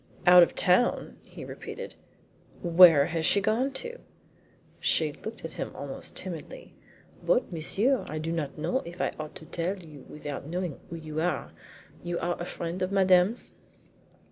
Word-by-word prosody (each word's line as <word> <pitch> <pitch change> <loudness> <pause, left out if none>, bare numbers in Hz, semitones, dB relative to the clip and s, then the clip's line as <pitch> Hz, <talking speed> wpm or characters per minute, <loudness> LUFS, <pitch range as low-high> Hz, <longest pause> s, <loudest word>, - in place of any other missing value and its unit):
"Out 180 0 +9
of 170 - +3
town!" 185 +7 +2
he - - -11
repeated. - - -8 0.7
"Where 170 -4 +8
has 165 0 -2
she 200 - +4
gone 225 +7 +1
to?" 485 - -5 0.8
She 155 -2 +1
looked 220 0 -8
at 165 - -5
him - - -5
almost 140 -1 -7
timidly. 170 -5 -6 0.5
"But, - - +1
monsieur, 210 - +1
I 155 - -4
do 160 +1 -3
not 150 -4 -3
know 255 +12 0
if 175 -5 -10
I - - 0
ought 155 -1 -6
to - - -10
tell 175 +5 -2
you 155 -7 -12
without 145 -2 -6
knowing 175 -2 -3
who 170 - -6
you 155 -1 -4
are. 180 +1 -1
Are - - -25 0.5
you 175 0 -3
a 175 0 -2
friend 170 +1 -5
of 185 +1 -1
Madame's?" 190 +2 +3
175 Hz, 165 wpm, -28 LUFS, 160-190 Hz, 0.8 s, Out